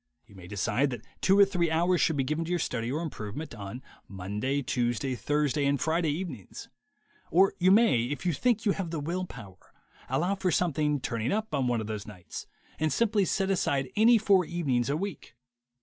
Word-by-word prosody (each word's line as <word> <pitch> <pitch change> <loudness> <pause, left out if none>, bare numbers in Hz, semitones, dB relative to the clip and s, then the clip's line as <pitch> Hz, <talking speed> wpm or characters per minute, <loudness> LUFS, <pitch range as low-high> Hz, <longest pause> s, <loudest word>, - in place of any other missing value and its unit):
You - - -19
may 90 -2 -12
decide 105 +8 0
that 125 -4 -7 0.2
two 190 +1 +4
or 200 - +8
three 180 -4 0
hours 170 +2 +2
should 160 - +2
be 135 - +2
given 155 +5 -1
to - - -7
your 175 - +1
study 120 -6 -2
or 155 +5 -2
improvement 140 -1 -6
on 105 +3 -7 0.2
Monday, 105 +9 -2
Tuesday, 125 +2 -1
Thursday 145 +2 0
and 140 -1 +1
Friday 165 0 +1
evenings; 170 +4 -6 0.6
or 190 +3 +4
you 185 +1 +4
may, 195 - +5
if 145 +7 -5
you 175 - +2
think 230 - +1
you 205 - +4
have 190 -3 -3
the 160 -1 -3
will 175 +5 -2
power, 100 - -13 0.4
allow 170 +9 +1
for 190 -1 -1
something 150 -4 +1
"turning 115 0 -2
up" 220 +1 -2
on 130 -2 +1
one 120 -2 +1
of - - -5
those 105 -1 -5
nights, 90 -6 -9 0.3
and 155 0 +1
simply 210 +3 +2
set 195 +1 0
aside 140 -7 0
any 230 +3 +6
four 200 -3 +4
evenings 140 -8 -1
a 145 - +1
week. 190 -9 -6
150 Hz, 200 wpm, -28 LUFS, 125-180 Hz, 0.6 s, or